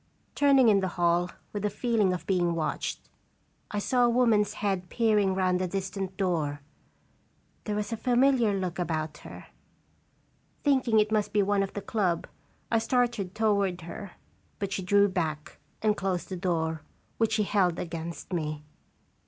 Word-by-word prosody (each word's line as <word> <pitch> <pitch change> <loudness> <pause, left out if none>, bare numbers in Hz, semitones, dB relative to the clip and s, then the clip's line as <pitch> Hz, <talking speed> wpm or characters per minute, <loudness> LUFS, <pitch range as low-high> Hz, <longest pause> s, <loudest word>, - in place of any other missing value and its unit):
Turning 275 -3 +5
in 205 -3 +5
the 190 - 0
hall 175 0 +2 0.2
with 205 - -3
the 210 - 0
feeling 215 -2 +1
of 180 -2 -4
being 175 -3 +1
watched, 160 -2 -3 0.6
I 210 - -4
saw 245 +4 +2
a 240 - +5
woman's 225 -4 +3
head 195 -4 -2
peering 210 -5 +2
round 185 -1 +1
a 185 - 0
distant 190 0 -4
door. 160 -7 -1 1.0
There 210 - -2
was 210 +1 -2
a - - -2
familiar 250 -1 +3
look 185 -3 -2
about 155 -3 -2
her. - - -11 1.2
Thinking 260 -6 +3
it 210 0 +2
must 210 -1 0
be 205 -1 +4
one 200 0 +2
of 195 - -3
the 205 - -5
club, 185 -7 0 0.5
I 230 - +4
started 230 -5 0
toward 200 -5 +1
her, 180 +3 -8 0.4
but 200 -1 -3
she - - -2
drew 200 +2 +4
back 160 -5 -3 0.2
and 215 -1 +3
closed 190 -3 -2
the 190 - -4
door, 160 -3 -1 0.4
which 225 -1 +2
she 215 -1 +2
held 185 -4 +1
against 170 +1 -6
me. 155 -3 -3
195 Hz, 160 wpm, -28 LUFS, 175-215 Hz, 1.2 s, Turning